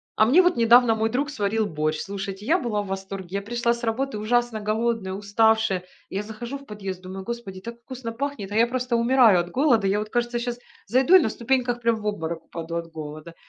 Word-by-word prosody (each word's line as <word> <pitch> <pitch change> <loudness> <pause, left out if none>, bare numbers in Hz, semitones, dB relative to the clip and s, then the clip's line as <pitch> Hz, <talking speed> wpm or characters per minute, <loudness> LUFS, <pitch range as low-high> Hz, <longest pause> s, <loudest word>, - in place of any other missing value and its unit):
А 215 - +4
мне 300 +11 +6
вот 355 -1 +2
недавно 235 0 +6
мой 220 0 0
друг 275 +6 -1
сварил 220 -4 0
борщ. 155 -3 -1
Слушайте, 195 0 -5
я 325 +10 +3
была 225 - -1
в 200 - -9
восторге, 195 -1 -5
я 200 - -2
пришла 235 +2 0
с 235 +1 -5
работы 235 +1 -1
ужасно 240 +1 0
голодная, 215 -2 -1
уставшая. 205 -1 +2 0.3
Я 195 +2 -2
захожу 235 +5 -7
в 275 - -16
подъезд, 195 -3 -6
думаю: 190 +1 -8
"Господи, 220 -4 -6
так 235 +2 -8
вкусно 240 -1 -7
пахнет, 240 -5 -4
а - - -3
я 230 +1 +5
просто 250 0 -1
умираю 235 -5 +5
от 175 0 -4
голода. 245 - +3
Я 200 +2 +1
вот, 215 0 -6
кажется, 240 0 0
щас 240 0 -3 0.3
зайду 260 +8 +3
и - - +11
на 220 - 0
ступеньках 245 +1 0
прям 230 -1 +2
в 215 - -9
обморок 165 -5 -3
упаду 165 0 -7
от 165 -1 -5
голода". 155 +1 -8
220 Hz, 220 wpm, -24 LUFS, 195-240 Hz, 0.3 s, и